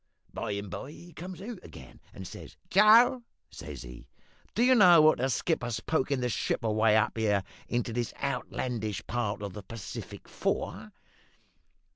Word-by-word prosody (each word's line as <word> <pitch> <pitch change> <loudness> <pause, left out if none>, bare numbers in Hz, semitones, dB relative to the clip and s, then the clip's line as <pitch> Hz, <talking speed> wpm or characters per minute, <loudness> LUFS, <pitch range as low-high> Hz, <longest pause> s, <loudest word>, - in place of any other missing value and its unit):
By 110 -3 -3
and 100 0 -4
by 135 - -6
he 175 +1 -14
comes 185 +2 -8
out 235 +2 -7
again, - - -13
and - - -11
he - - -7
says - - -10
"`Joe,' 225 +6 +6 0.3
says - - -8
he, - - -11 0.5
`do 235 - +3
you 255 - +6
know 180 -8 +8
what 155 -2 +5
the 130 +2 +1
skipper's 125 -3 -1
pokin' 140 -4 0
the 125 - +1
ship 110 +2 -1
away 110 0 +3
up 110 - +1
here 105 -3 +2 0.2
into 120 -1 -2
this 120 0 -2
outlandish 110 -6 -3
part 105 -3 -2
of 100 -2 -5
the 105 - -7
Pacific 110 0 -8
for?' 105 +3 -3
120 Hz, 165 wpm, -29 LUFS, 105-175 Hz, 0.5 s, know